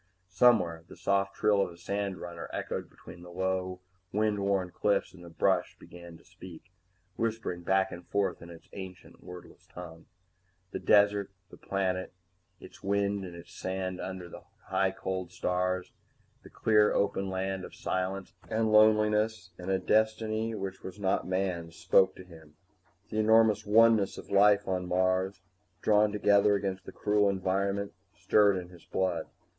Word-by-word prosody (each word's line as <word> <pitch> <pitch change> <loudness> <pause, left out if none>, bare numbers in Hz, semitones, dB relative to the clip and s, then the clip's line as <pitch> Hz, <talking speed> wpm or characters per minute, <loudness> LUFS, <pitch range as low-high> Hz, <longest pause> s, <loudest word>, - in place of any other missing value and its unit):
Somewhere 90 -6 +3
the - - -13
soft 100 +2 0
trill 100 -2 +3
of - - 0
a 85 - -13
sandrunner 90 -2 -4
echoed - - -4
between 85 - -13
low 90 +1 -3 0.3
wind 105 0 +1
worn 100 -2 0
cliffs, 100 +4 0
and 90 -1 -14
the 85 - -10
brush 80 - 0
began 85 -1 -12
to - - -22
speak, 90 0 -13 0.5
whispering 110 -6 -2
back 95 +2 +1
and 85 0 -9
forth 100 -2 -1
in 85 - -11
its 85 -1 -13
ancient 95 -2 -10
wordless 90 0 -12
tongue. 85 -2 -11 0.6
The - - -4
desert, 100 -1 +4 0.2
the - - -12
planet 95 -2 -2 0.5
and - - -12
its - - -19
wind 100 0 0
and 85 -1 -10
sand 95 +2 -4
under 95 -2 -6
the - - -11 0.2
high 95 - +1
cold 95 -1 -4
stars, 90 0 -1 0.5
the - - -14
clean 105 -1 +3
open 100 -1 0
land 95 0 -3
of - - -10
silence 95 +1 -3 0.2
and 110 0 +1
loneliness 105 -2 +3
and 90 +1 -6
a 95 - +2
destiny 110 +2 0
which 95 -2 -5
was 95 +2 -9
not 95 -1 0
man's, 90 -3 -2
spoke 95 +2 +3
to - - -11
him. 80 -4 -16 0.5
The 110 - -2
enormous 110 -1 +4
oneness 110 -1 +4
of - - -10
life 100 0 +5
on 90 -1 -1
Mars, 95 +1 0 0.4
drawn 105 0 +4
together 100 0 +4
against 95 -2 -3
the - - -6
cruel 105 -1 +2
environment, 100 +1 -1 0.2
stirred 100 -2 +3
in 90 -1 -6
his 90 -2 -16
blood. 90 -4 -1
95 Hz, 155 wpm, -29 LUFS, 90-105 Hz, 0.6 s, life